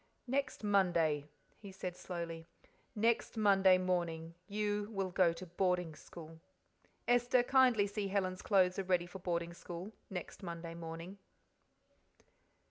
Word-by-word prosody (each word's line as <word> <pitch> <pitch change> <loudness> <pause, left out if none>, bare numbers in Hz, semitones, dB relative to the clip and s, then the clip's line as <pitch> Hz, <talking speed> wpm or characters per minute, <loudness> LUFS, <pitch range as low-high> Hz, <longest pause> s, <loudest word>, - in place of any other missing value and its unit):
"Next 265 -2 -2
Monday," 170 -7 +2 0.3
he 200 -2 -10
said 185 -2 -5
slowly 170 -2 -6 0.5
"next 225 +1 +1
Monday 195 -3 +5
morning 170 -3 -1
you 205 0 -1
will 195 -4 -2
go 180 -2 +4
to 170 +2 -8
boarding 180 -1 0
school. 160 +1 -11 0.7
Esther, 245 +1 +4
kindly 250 -5 +4
see 205 0 -3
Helen's 190 -2 -1
clothes 185 -2 +3
are - - 0
ready 180 -2 +1
for 180 +2 -9
boarding 170 -1 -2
school 175 +3 -7 0.2
next 185 0 -6
Monday 170 -2 -6
morning." 165 +3 -7
185 Hz, 130 wpm, -35 LUFS, 170-205 Hz, 0.7 s, Monday